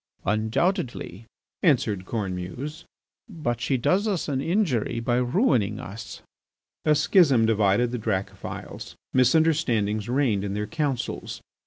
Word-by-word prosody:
"Undoubtedly," 110 Hz, -, -1 dB, 0.3 s
answered 110 Hz, -, +2 dB
Cornemuse, 110 Hz, -, -4 dB, 0.4 s
"but 140 Hz, -, -3 dB
she 130 Hz, +2 st, +1 dB
does 190 Hz, -, +1 dB
us 195 Hz, -6 st, -1 dB
an 135 Hz, -3 st, -1 dB
injury 145 Hz, -, 0 dB
by 120 Hz, +1 st, 0 dB
ruining 125 Hz, -, +1 dB
us." 100 Hz, +4 st, -8 dB, 0.6 s
A 155 Hz, -1 st, +5 dB
schism 145 Hz, -, +4 dB
divided 110 Hz, +2 st, +2 dB
the 125 Hz, -, -3 dB
Dracophils. 100 Hz, -3 st, -5 dB, 0.2 s
Misunderstandings 125 Hz, -7 st, +2 dB
reigned 125 Hz, -7 st, +1 dB
in 100 Hz, -1 st, -3 dB
their 105 Hz, 0 st, -2 dB
councils. 145 Hz, -3 st, -3 dB
120 Hz, 115 wpm, -25 LUFS, 105-155 Hz, 0.6 s, A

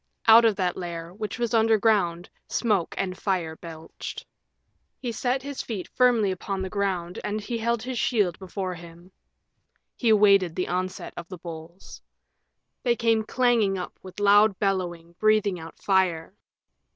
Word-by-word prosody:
Out 230 Hz, +1 st, +8 dB
of 220 Hz, -2 st, +3 dB
that 180 Hz, -3 st, -1 dB
lair, 170 Hz, -1 st, -6 dB
which 210 Hz, +1 st, -5 dB
was 235 Hz, -2 st, -2 dB
underground, 215 Hz, -6 st, +2 dB, 0.2 s
smoke 210 Hz, -7 st, 0 dB
and 185 Hz, -2 st, -2 dB
fire 180 Hz, -5 st, -2 dB
belched. 160 Hz, -1 st, -9 dB, 0.7 s
He 245 Hz, -, -4 dB
set 250 Hz, +3 st, -1 dB
his 280 Hz, -1 st, -5 dB
feet 205 Hz, -6 st, -5 dB
firmly 240 Hz, -6 st, +3 dB
upon 190 Hz, +1 st, -4 dB
the 190 Hz, -, -5 dB
ground 185 Hz, -3 st, -2 dB
and 210 Hz, +1 st, -2 dB
he 230 Hz, +3 st, -4 dB
held 235 Hz, 0 st, 0 dB
his 255 Hz, -2 st, -3 dB
shield 205 Hz, -9 st, +1 dB
before 190 Hz, 0 st, -4 dB
him. 170 Hz, +1 st, -13 dB, 0.8 s
He 235 Hz, -, 0 dB
awaited 200 Hz, -5 st, +5 dB
the 180 Hz, -, -2 dB
onset 185 Hz, +1 st, -3 dB
of 170 Hz, -, -7 dB
the 185 Hz, -, -8 dB
bulls. 165 Hz, +1 st, -10 dB, 0.8 s
They 240 Hz, -2 st, +2 dB
came 230 Hz, -1 st, +2 dB
clanging 230 Hz, -5 st, +2 dB
up 180 Hz, -, -7 dB
with 185 Hz, +1 st, -10 dB
loud 205 Hz, 0 st, +5 dB
bellowing, 175 Hz, -4 st, -2 dB
breathing 215 Hz, -4 st, +2 dB
out 165 Hz, 0 st, -10 dB
fire. 185 Hz, -3 st, +1 dB
195 Hz, 150 wpm, -25 LUFS, 175-220 Hz, 0.8 s, Out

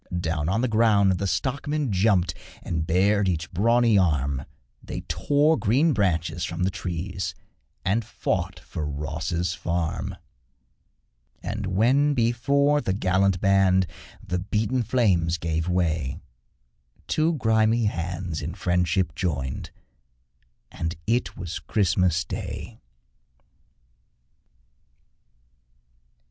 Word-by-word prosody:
Down 80 Hz, -2 st, -1 dB
on 110 Hz, +5 st, +1 dB
the 130 Hz, -, +1 dB
ground 105 Hz, -5 st, +3 dB
the 100 Hz, -, -1 dB
stockmen 140 Hz, +4 st, -1 dB
jumped 95 Hz, -4 st, +2 dB, 0.3 s
And 80 Hz, -1 st, -2 dB
bared 100 Hz, +3 st, +3 dB
each 85 Hz, 0 st, -2 dB
brawny 115 Hz, +3 st, +3 dB
arm, 70 Hz, -6 st, 0 dB, 0.4 s
They -, -, -6 dB
tore 150 Hz, +2 st, +2 dB
green 135 Hz, +9 st, +3 dB
branches 90 Hz, -7 st, 0 dB
from 90 Hz, -, -2 dB
the 95 Hz, -, +1 dB
trees 90 Hz, +1 st, -4 dB, 0.5 s
And 105 Hz, +5 st, +1 dB
fought 95 Hz, -5 st, -2 dB
for 80 Hz, 0 st, -6 dB
Ross's 80 Hz, +4 st, -2 dB
farm; 85 Hz, -2 st, -2 dB, 1.3 s
And 100 Hz, 0 st, -3 dB
when 130 Hz, +10 st, +3 dB
before 140 Hz, +5 st, +2 dB
the 95 Hz, -, -1 dB
gallant 95 Hz, -1 st, +1 dB
band 95 Hz, -1 st, +4 dB, 0.4 s
The 90 Hz, 0 st, -2 dB
beaten 110 Hz, +6 st, 0 dB
flames 95 Hz, -8 st, +2 dB
gave 80 Hz, +1 st, -2 dB
way, 80 Hz, -6 st, 0 dB, 0.9 s
Two 160 Hz, +2 st, +1 dB
grimy 110 Hz, -2 st, +2 dB
hands 85 Hz, -4 st, -3 dB
in 80 Hz, +4 st, -5 dB
friendship 90 Hz, 0 st, +1 dB
joined 70 Hz, -8 st, -3 dB, 1.0 s
And 80 Hz, +1 st, -3 dB
it 120 Hz, +3 st, 0 dB
was 90 Hz, -3 st, -5 dB
Christmas 90 Hz, -4 st, +1 dB
Day. -, -, -6 dB
95 Hz, 105 wpm, -25 LUFS, 85-115 Hz, 1.3 s, band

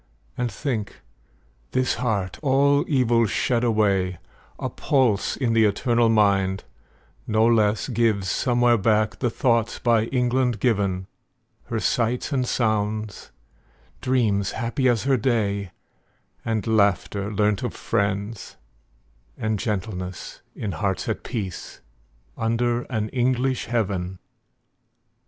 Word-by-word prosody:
And 120 Hz, -2 st, -2 dB
think, 115 Hz, -8 st, -3 dB, 0.8 s
this 130 Hz, 0 st, +1 dB
heart, 100 Hz, -7 st, -1 dB
all 140 Hz, 0 st, +3 dB
evil 120 Hz, -5 st, +3 dB
shed 120 Hz, +3 st, 0 dB
away, 100 Hz, -6 st, +1 dB, 0.4 s
A -, -, -3 dB
pulse 125 Hz, -8 st, +1 dB
in 120 Hz, -4 st, 0 dB
the 115 Hz, -1 st, +4 dB
eternal 115 Hz, +3 st, +2 dB
mind, 100 Hz, -3 st, +2 dB, 0.6 s
no 110 Hz, +1 st, +3 dB
less 110 Hz, -2 st, +2 dB
Gives 115 Hz, -6 st, +1 dB
somewhere 120 Hz, +2 st, +2 dB
back 110 Hz, +1 st, +1 dB
the 125 Hz, -, +1 dB
thoughts 115 Hz, -1 st, +1 dB
by 115 Hz, -2 st, +2 dB
England 125 Hz, -2 st, 0 dB
given; 100 Hz, -5 st, 0 dB, 0.6 s
Her 115 Hz, -2 st, -2 dB
sights 120 Hz, +6 st, 0 dB
and 130 Hz, -3 st, 0 dB
sounds; 110 Hz, -2 st, -1 dB, 0.7 s
dreams 110 Hz, -7 st, +1 dB
happy 130 Hz, +2 st, 0 dB
as 120 Hz, -3 st, +1 dB
her 135 Hz, -1 st, +2 dB
day; 105 Hz, -5 st, 0 dB, 0.7 s
And 110 Hz, -3 st, -1 dB
laughter, 100 Hz, -1 st, +1 dB
learnt 105 Hz, -1 st, +1 dB
of -, -, -4 dB
friends; 100 Hz, +1 st, -2 dB, 0.8 s
and 110 Hz, -2 st, -1 dB
gentleness, 95 Hz, -4 st, -4 dB
In 105 Hz, -, -4 dB
hearts 95 Hz, -1 st, -2 dB
at -, -, -2 dB
peace, 100 Hz, -8 st, -6 dB, 0.6 s
under 120 Hz, +1 st, 0 dB
an 110 Hz, -3 st, -2 dB
English 130 Hz, +1 st, 0 dB
heaven. 95 Hz, -6 st, -2 dB
110 Hz, 115 wpm, -24 LUFS, 100-120 Hz, 0.8 s, the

